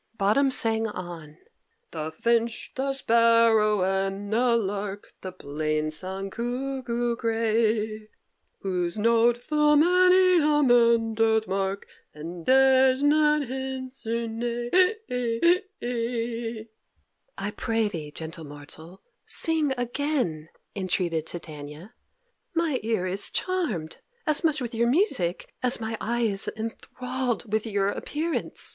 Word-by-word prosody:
Bottom 215 +8 +3
sang 225 -3 +1
on: 170 -6 -8 0.5
"The 160 -1 -4
finch, 230 +6 0
the 275 +1 -1
sparrow, 230 -4 +4
and 195 +2 -1
the 235 +1 +3
lark, 200 -1 -4
The 185 - -6
plain 155 -2 -2
song 190 +4 -5
cuckoo 240 0 -2
gray, 220 -1 0 0.5
Whose 180 -1 -2
note 230 +2 +3
full 300 +4 +2
many 365 +2 +5
a 295 0 +3
man 235 -3 +4
doth 220 0 +2
mark, 195 0 -2 0.3
And 165 +2 -8
dares 265 0 +5
not 300 0 +4
answer 260 -3 -4
nay." 240 +1 -3 2.7
"I 205 - -3
pray 225 0 0
thee, 160 -7 -6
gentle 160 +2 -8
mortal, 150 +5 -11 0.2
sing 320 -3 +2
again," 245 - -2 0.3
entreated 175 -4 -1
Titania. 155 +4 -9 0.6
"My 325 -6 +1
ear 220 -4 -1
is 190 +2 -2
charmed 250 - -2 0.3
as 305 -1 +2
much 310 -3 +1
with 240 -1 -4
your 235 +1 +1
music 255 - 0
as 250 -1 +1
my 225 0 -3
eye 235 +2 -1
is 200 -3 +1
enthralled 245 0 -4
with 220 +1 0
your 200 -2 +1
appearance. 315 +9 -3
225 Hz, 115 wpm, -26 LUFS, 190-260 Hz, 2.7 s, many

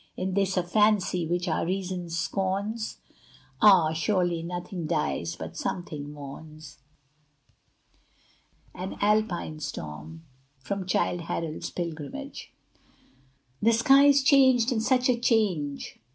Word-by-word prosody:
Is 185 0 -2
this 195 -1 +1
a 180 - +2
fancy 185 -2 +2
which 175 +2 -1
our 160 - 0
reason 185 -1 -3
scorns? 195 +6 -2 0.6
Ah! 185 -7 +6
surely 175 0 0
nothing 175 0 -5
dies 85 - -1
but 80 0 -8
something 150 - -4
mourns. 150 +1 -11 1.9
AN 185 +2 -6
ALPINE 205 -7 0
STORM 80 - -7 0.3
From 185 +8 -5
'Childe 175 -1 0
Harold's 165 -1 -4
Pilgrimage' 175 - -6 1.1
The 230 +2 +4
sky 270 +5 +6
is 280 -1 +5
changed 260 -3 +5
and 225 -3 0
such 255 +2 +2
a 250 - +3
change! 190 - 0
180 Hz, 110 wpm, -27 LUFS, 155-215 Hz, 1.9 s, Ah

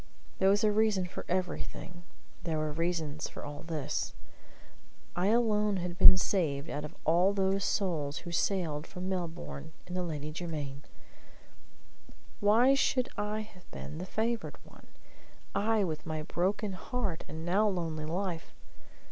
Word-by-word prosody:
There 190 - +5
was 205 +3 +4
a 215 - +5
reason 210 -3 +3
for 180 - -7
everything; 180 -1 -3 0.4
there 165 -2 -1
were 155 0 0
reasons 160 -2 -1
for - - -8
all 145 0 -6
this. 150 - -2 1.0
I 180 +2 +2
alone 210 -2 +3
had 175 -1 -3
been 185 - +9
saved 160 -7 0
out 150 - -3
of 150 - -7
all 175 +5 +5
those 195 0 +2
souls 155 -10 0
who 175 - -4
sailed 170 -4 0
from 185 0 -5
Melbourne 160 - -4
in 180 - -7
the 180 - 0
Lady 155 -3 -3
Jermyn. 150 -4 -4 1.6
Why 225 +6 +6
should 260 -2 +2
I 210 +1 -1
have 210 -4 -13
been 155 - -7
the 185 - -5
favored 230 +4 -1
one; - - -17 0.7
I 215 0 +3
with 160 -3 -3
my 155 -1 -2
broken 195 +5 0
heart 195 -3 -3
and 160 +1 -6
now 200 +5 +4
lonely 165 -5 -1
life? 175 +1 -3
180 Hz, 150 wpm, -31 LUFS, 155-200 Hz, 1.6 s, been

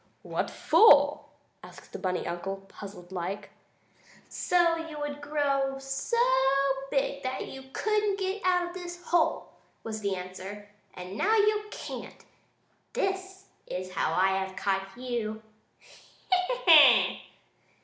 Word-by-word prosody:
"What - - -2
for?" 445 - +5 0.4
asked - - -14
the - - -6
bunny 185 -1 -2
uncle, 195 +3 -5
puzzled 195 -3 -11
like. 190 +3 -5 0.8
"So 345 -2 +2
you 325 -2 -7
would 290 0 -5
grow 280 -2 0
so 270 - -3 0.7
big 275 0 -1
that 260 0 -3
you 265 0 -9
couldn't 420 +1 0
get 385 +1 -2
out 360 -1 +2
of - - -11
this 350 -1 -8
hole," 345 -2 +1 0.3
was 220 -1 -5
the 200 -2 -1
answer. 190 +3 -8 0.3
"And 180 +2 -8
now 440 +2 +3
you 425 0 +2
can't! - - -8 0.7
This 385 0 -3 0.2
is 185 0 -5
how - - 0
I 190 +1 +2
have 190 0 -8
caught 195 0 -1
you! 230 -4 -4 0.9
Ha! 370 +7 +1
Ha!" 300 -8 +7
270 Hz, 130 wpm, -28 LUFS, -, 0.9 s, Ha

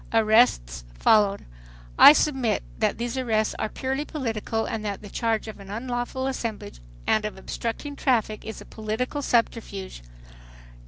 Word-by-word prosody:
Arrests 215 - +3
followed. 205 - +3 0.5
I - - +11
submit 265 - +1 0.2
that - - +1
these 240 +3 -3
arrests 220 -4 +1
are 220 - -1
purely 265 +5 -2
political 225 -7 -3
and 220 -1 -4
that 205 -1 -4
the 205 - -9
charge 225 -2 -1
of 220 - -8
an 195 -1 -11
unlawful 245 +4 -3
assemblage 230 - -4 0.3
and 215 - +2
of 210 -2 -4
obstructing 235 +8 -5
traffic 225 -6 0
is 220 - -7
a - - -11
political 220 +6 -3
subterfuge. 225 - -1
225 Hz, 145 wpm, -25 LUFS, 215-250 Hz, 0.5 s, I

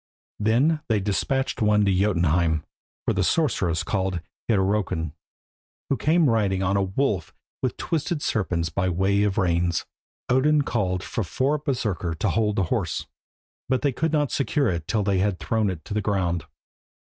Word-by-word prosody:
Then 130 +9 +2
they 110 -2 +3
despatched 125 +8 -1
one 105 -1 +4
to 100 - +3
Jotunheim 85 -5 +2 0.4
for - - +2
the - - +1
sorceress 85 -1 +1
called 95 0 -1 0.3
Hyrrokin, 95 -6 +1 0.8
who - - +4
came 160 +6 +3
riding 100 -5 +1
on 95 +1 +1
a 100 - +3
wolf 95 - -1 0.3
with - - -1
twisted 160 -1 -2
serpents 90 -6 0
by 95 0 0
way 95 +3 +2
of 105 -2 +1
reins. 85 -3 +1 0.4
Odin 145 +4 +3
called 90 -7 -1
for 115 - -2
four 135 - 0
Berserkir 105 - -2
to - - 0
hold 105 -2 +1
the 95 - +2
horse, - - -2 0.6
but 130 0 +1
they 140 - +3
could 160 +5 -1
not 150 -3 +1
secure 140 -1 +1
it 85 -3 -3
till 110 -3 +1
they 100 -2 +1
had 100 -1 +1
thrown 110 0 0
it 80 -5 -6
to - - -5
the 105 - 0
ground. 90 -5 0
100 Hz, 165 wpm, -25 LUFS, 90-125 Hz, 0.8 s, one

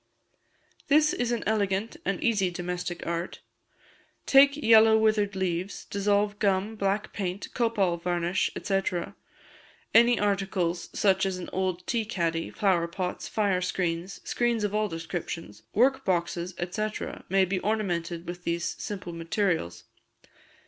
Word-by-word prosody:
This 305 +1 +4
is 245 -1 -1
an 240 - -1
elegant 205 0 0
and 195 -1 -1
easy 205 -6 +2
domestic 175 0 -4
art. 170 +1 -3 0.8
Take 280 +1 +6
yellow 225 -5 +6
withered 215 -2 +2
leaves, 185 0 -2
dissolve 205 +1 0
gum, 200 +1 +1
black 200 0 -1
paint, 190 -1 -3
copal 210 -7 +1
varnish, 175 +1 0
&c. 195 -1 0 1.1
Any 235 +1 +6
articles, 190 -4 -1
such 190 -2 +2
as 190 -1 -2
an 180 - -7
old 185 -1 -1
tea 235 -2 0
caddy, 165 -6 -1
flower 180 -4 +1
pots, 180 +1 -4
fire 200 -4 +1
screens, 180 0 -2
screens 240 -2 0
of 205 -1 -1
all 215 0 +1
descriptions, 165 - -6
work 260 +5 +3
boxes, 175 0 -1 0.2
&c., 215 +3 -1 0.4
may 190 +1 +4
be 185 +1 -1
ornamented 175 -5 -2
with 175 0 -6
these 170 -1 -1
simple 190 -4 -5
materials. 165 - -1
190 Hz, 130 wpm, -27 LUFS, 175-215 Hz, 1.1 s, Take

